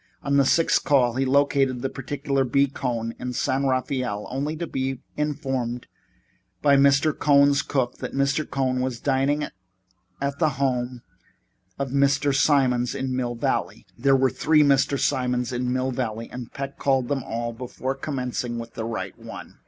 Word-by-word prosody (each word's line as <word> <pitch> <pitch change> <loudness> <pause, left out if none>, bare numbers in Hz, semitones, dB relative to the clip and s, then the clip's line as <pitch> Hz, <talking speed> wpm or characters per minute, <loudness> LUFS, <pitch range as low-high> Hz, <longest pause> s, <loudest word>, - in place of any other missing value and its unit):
On 140 0 +1
the 140 - +5
sixth 165 +4 +3
call 130 -5 +3
he 135 +2 0
located 135 -2 +2
the - - +1
particular 135 0 -2
B. 140 +2 +3
Cohn 120 -4 -3
in 125 0 -4
San 135 +2 0
Rafael, 130 -5 -1
only 145 +4 -2
to 170 - -3
be 135 -3 -3 0.2
informed 135 -5 -2 0.8
by 140 -1 +6
Mr. 140 +2 +4
Cohn's 140 -1 +4
cook 130 -2 -2
that - - -5
Mr. 140 +2 0
Cohn 130 -1 0
was 130 -2 -2
dining 140 +2 +1 0.7
at 140 0 -2
the 155 - +3
home 125 -2 -1 0.7
of 135 -2 -3
a - - -6
Mr. 140 0 +3
Simons 130 -3 +2
in 130 -1 -2
Mill 120 -1 -2
Valley. 115 - -2
There 135 +3 +3
were 130 0 +3
three 155 -1 +3
Mr. 140 -1 +3
Simons 125 -2 0
in 125 0 -1
Mill 130 +1 0
Valley, 115 -2 -3
and 125 -2 -7
Peck 140 0 -6
called 135 -3 +1
them 140 0 -1
all 115 +1 -3
before 125 +2 -4
connecting 125 -4 -3
with 115 0 -7
the 110 - -4
right 115 -1 -4
one. - - -10
135 Hz, 170 wpm, -24 LUFS, 125-140 Hz, 0.8 s, by